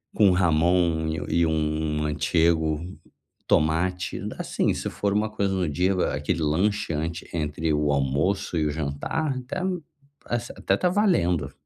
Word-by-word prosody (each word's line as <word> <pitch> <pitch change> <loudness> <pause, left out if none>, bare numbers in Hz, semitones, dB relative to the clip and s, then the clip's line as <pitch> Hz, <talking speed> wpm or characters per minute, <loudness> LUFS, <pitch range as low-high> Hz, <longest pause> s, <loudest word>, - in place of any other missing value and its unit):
com 100 -4 +5
jamón 85 -1 +2 0.2
e 85 0 +2
um 75 -1 0
antigo 80 +1 +1 0.7
tomate, 90 +4 +1 0.2
assim, - - 0
se - - -3
for 100 -1 -1
uma 105 +1 +1
coisa 100 -2 -1
no 95 -2 0
dia, 90 +6 +1 0.2
aquele 75 +3 -1
lanche 90 +5 +1
antes, 80 +2 -3
entre 80 0 -1
o 75 0 +1
almoço 70 +7 0
e 80 - +1
o 75 - 0
jantar, 80 - -2
até, 130 +9 -5 0.7
assim 120 0 -3
até - - +1
tá 180 - +1
valendo. 90 - +2
80 Hz, 140 wpm, -25 LUFS, 75-95 Hz, 0.7 s, com